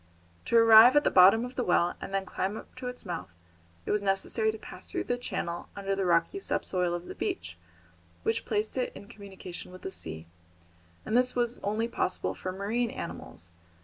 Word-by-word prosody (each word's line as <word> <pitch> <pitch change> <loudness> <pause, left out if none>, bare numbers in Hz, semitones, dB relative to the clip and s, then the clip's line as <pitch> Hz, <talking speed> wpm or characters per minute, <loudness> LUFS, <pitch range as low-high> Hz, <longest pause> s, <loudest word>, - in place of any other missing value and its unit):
To 235 - +3
arrive 230 +2 +9
at 295 - +5
the - - +2
bottom 195 +6 +7
of 250 - -8
the 250 - 0
well 175 -2 +2
and - - -6
then 195 0 -1
climb 195 +3 -3
up - - -11
to 255 -1 -5
its 250 0 -7
mouth 90 -1 -5 0.6
it - - -2
was 210 - +2
necessary 200 +3 +1
to 220 - -8
pass - - -10
through - - -2
the 245 - -1
channel 175 -8 -4
under 195 -1 -2
the 195 -1 -1
rocky 170 - +2
sub - - -2
soil 180 -2 0
of 175 0 -6
the - - -7
beach, 85 0 -4 0.7
which 225 0 0
placed 215 +3 -1
it 250 - -1
in 200 - -11
communication 190 -4 -9
with 185 - -12
the 190 - -4
sea, 80 - -7 0.8
and 220 - -1
this 250 +1 +3
was 240 0 0
only 215 +3 -1
possible 185 -5 -1
for 185 - -5
marine 215 +5 -1
animals. 85 - -8
200 Hz, 205 wpm, -29 LUFS, 180-230 Hz, 0.8 s, arrive